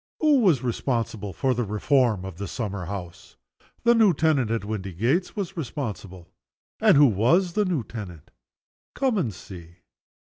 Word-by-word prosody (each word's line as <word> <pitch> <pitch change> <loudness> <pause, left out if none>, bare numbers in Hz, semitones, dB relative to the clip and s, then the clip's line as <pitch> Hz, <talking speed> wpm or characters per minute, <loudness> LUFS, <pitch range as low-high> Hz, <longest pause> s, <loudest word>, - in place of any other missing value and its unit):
Who 300 -3 +4
was 175 - +3
responsible 115 -4 -2
for 130 +9 0
the 120 0 -1
reform 110 -1 +1
of 95 -2 -9
the 100 - -4
summer 100 -3 -4
house? 90 -2 -8 0.5
The 235 0 +5
new 215 -7 +4
tenant 145 -7 +2
at 115 -3 -2
Windygates 110 - -1
was 195 -2 -4
responsible. 110 - -6 0.5
And - - +5
who 145 - +7
was 140 - +2
the 210 +2 +1
new 170 -9 -1
tenant? 95 -9 -9 0.6
Come, 260 -6 +1
and 125 -11 -1
see. 85 -3 -12
115 Hz, 155 wpm, -25 LUFS, 100-165 Hz, 0.6 s, who